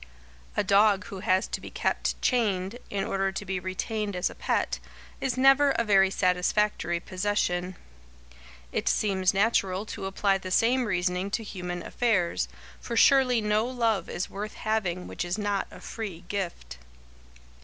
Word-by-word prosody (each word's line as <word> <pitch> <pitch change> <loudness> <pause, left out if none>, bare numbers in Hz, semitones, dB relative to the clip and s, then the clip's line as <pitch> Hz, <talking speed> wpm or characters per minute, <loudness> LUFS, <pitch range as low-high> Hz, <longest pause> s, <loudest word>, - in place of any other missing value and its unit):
A - - +3
dog 205 0 +4
who 195 - -7
has 190 -2 +2
to - - -5
be - - -8
kept - - -1
chained, 210 -3 +1
in 195 -1 -1
order 195 0 0
to 200 +2 -5
be 190 -1 -2
retained 200 +2 -3
as 180 - 0
a - - -9
pet, - - -1 0.4
is 265 -2 -1
never 270 +2 +6
a 235 - +1
very 195 -3 +4
satisfactory 180 -1 +1
possession. 185 -1 -1 1.0
It - - 0
seems 190 -3 +2
natural 195 -1 +1
to 195 - -5
apply 195 0 +1
the 185 - -6
same 240 +6 +3
reasoning 180 -1 0
to 225 +3 -2
human 180 -4 -5
affairs, 210 -8 0 0.3
for 235 - -4
surely 255 -2 +5
no 210 +2 +1
love 230 -7 0
is 175 - -3
worth 210 +2 -6
having 195 -5 -1
which - - -4
is 175 +3 -2
not 205 -2 -1
a - - -12
free 200 -7 -6
gift. 170 - -4
195 Hz, 155 wpm, -27 LUFS, 185-220 Hz, 1.0 s, never